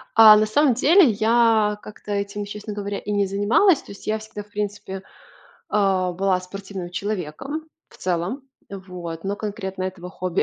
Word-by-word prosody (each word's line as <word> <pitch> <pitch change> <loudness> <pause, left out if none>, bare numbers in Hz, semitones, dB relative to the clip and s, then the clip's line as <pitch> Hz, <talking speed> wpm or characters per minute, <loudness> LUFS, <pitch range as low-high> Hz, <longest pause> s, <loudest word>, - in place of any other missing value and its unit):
А, 220 -1 +10
на 215 - +3
самом 260 +3 +3
деле, 315 +3 +6
я 220 -1 +3
как-то 210 0 -10
этим, 200 0 -2
честно 210 +1 -7
говоря, 205 -1 -4
и 210 - -5
не 205 -1 +2
занималась. 225 - +3
То - - -13
есть 200 - -12
я 215 0 0
всегда, 215 -1 -8
в 205 - -26
принципе, 205 -2 -4 0.7
а, 190 -3 +1
была 190 0 +1
спортивным 190 -1 -7
человеком, 205 - -4 0.3
в - - -18
целом. 185 +9 -2 0.3
Вот. 180 -3 -7
Но 200 +1 -2
конкретно 190 -3 -4
этого 180 -1 -6
хобби 185 -1 -1
205 Hz, 165 wpm, -23 LUFS, 190-215 Hz, 0.7 s, А